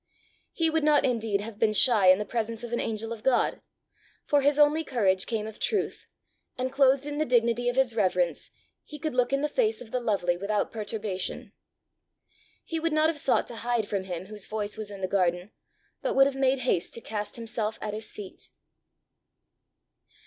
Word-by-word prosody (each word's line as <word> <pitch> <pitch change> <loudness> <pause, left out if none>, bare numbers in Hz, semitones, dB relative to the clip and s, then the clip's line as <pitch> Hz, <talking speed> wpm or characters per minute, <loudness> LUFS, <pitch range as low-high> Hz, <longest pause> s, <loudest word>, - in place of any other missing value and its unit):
He 330 - +1
would 320 -1 +1
not 300 -1 +4
indeed 225 -5 0
have 215 0 -8
been 215 -1 +3
shy 215 -3 +5
in 185 0 +8
the 210 - -3
presence 230 +1 -3
of 240 0 -6
an 235 - 0
angel 225 +1 -2
of 225 - -10
God; 255 +1 +1 0.6
for 290 -1 +3
his 285 +1 +3
only 300 +2 +4
courage 195 -9 +1
came 220 -3 -2
of 220 -1 -9
truth, 420 - -1 0.5
and 255 +1 -2
clothed 270 0 +3
in 295 0 -4
the - - +3
dignity 240 -2 +2
of 245 - -2
his 260 -4 +2
reverence, 180 -6 0 0.3
he 300 - -10
could 310 -1 -3
look 250 0 +1
in 275 0 +1
the - - +2
face 450 +5 +1
of 230 -3 -11
the 250 - 0
lovely 200 -7 0
without 200 +3 -1
perturbation. 210 0 -4 1.1
He 330 - -3
would 330 0 -1
not 310 +1 +4
have 315 -2 -2
sought 270 - +2
to 235 - -7
hide 235 -1 -1
from 195 -2 -2
him 180 -1 -5
whose 210 0 -7
voice 210 -1 -3
was 215 -1 -6
in 200 -1 -9
the 185 - 0
garden, 180 0 0 0.5
but - - -1
would 270 0 +7
have 275 -1 -1
made 270 0 +2
haste 175 -8 0
to 230 - -7
cast 210 -2 -4
himself 225 -1 -3
at 210 - -4
his 215 +1 -4
feet. 200 -3 -6
230 Hz, 200 wpm, -27 LUFS, 205-270 Hz, 1.1 s, in